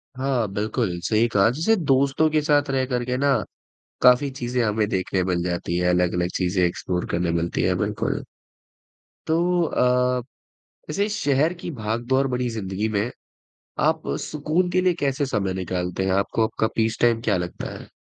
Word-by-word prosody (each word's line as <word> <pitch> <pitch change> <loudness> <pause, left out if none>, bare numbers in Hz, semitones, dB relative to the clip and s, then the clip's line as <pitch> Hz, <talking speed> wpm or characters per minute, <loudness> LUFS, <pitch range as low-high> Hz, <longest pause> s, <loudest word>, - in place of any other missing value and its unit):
हाँ, 130 -3 0
बिल्कुल, 105 -3 -1
सही 110 +1 +2
कहा 105 -1 +3
जैसे 165 - +2
दोस्तों 140 -2 +2
के 155 - +2
साथ 145 -1 +2
रह 130 -1 +1
कर 125 -2 -1
के 125 0 -1
ना 140 +1 +3 0.7
काफ़ी, 125 +3 +5
चीज़ें 125 -1 -2
हमें 105 -1 +1
देखने 95 -1 -1
मिल 90 -2 0
जाती 85 -1 -2
हैं, 90 0 +1
अलग-अलग 90 0 +1
चीज़ें 90 0 +1
एक्सप्लोर 90 +1 -3
करने 85 0 0
मिलती 85 0 -1
हैं, - - +2
बिल्कुल। - - -1 1.1
तो 160 +1 +2 0.3
अ, 125 -4 +2 0.7
वैसे 200 +7 0
शहर 155 -6 +1
की - - -5
भाग-दौर 120 +2 0
बड़ी 125 -1 -1
ज़िंदगी 105 -1 -3
में, 105 +2 0 0.7
आप 160 +1 +1
सुकून 155 +4 -1
के 185 +1 +2
लिए 180 -1 +3
कैसे 140 0 0
समय 105 -8 -1
निकालते 90 0 -2
हैं? 95 - +1
आपको 100 +3 +1
आपका 110 0 0
पीस 110 0 0
टाइम 115 -1 +3
क्या 105 -5 +1
लगता 90 0 -5
है? - - -12
120 Hz, 165 wpm, -23 LUFS, 95-140 Hz, 1.1 s, काफ़ी